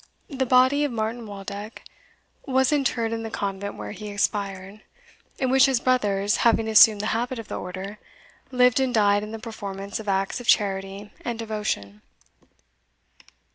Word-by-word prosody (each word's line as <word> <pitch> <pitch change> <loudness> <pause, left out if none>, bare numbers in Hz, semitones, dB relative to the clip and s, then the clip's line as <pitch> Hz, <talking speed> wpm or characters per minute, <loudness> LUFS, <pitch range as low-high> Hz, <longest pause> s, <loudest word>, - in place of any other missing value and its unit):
The 265 -2 -1
body 260 +4 +4
of 290 - -1
Martin 225 0 -3
Waldeck 205 +2 -8 0.6
was 265 0 +2
interred 245 -6 0
in 225 - -3
the 225 - -5
convent 200 -1 -4
where - - -7
he 210 +1 -8
expired, 200 -1 -3 0.6
in 260 -2 0
which 265 0 +6
his 265 -3 +1
brothers, 210 -5 +1
having 225 -1 +2
assumed 215 -1 +7
the - - -4
habit 245 +3 -2
of 225 - -8
the - - -4
order, 190 +3 -7 0.5
lived 250 -1 +3
and 265 -1 +1
died 205 -3 +3
in 210 +1 -7
the 225 - -5
performance 200 -3 -6
of 215 -2 -5
acts 195 +3 0
of 240 - -11
charity 195 0 0
and 235 -2 -3
devotion. 210 - -4
215 Hz, 160 wpm, -24 LUFS, 200-245 Hz, 0.6 s, assumed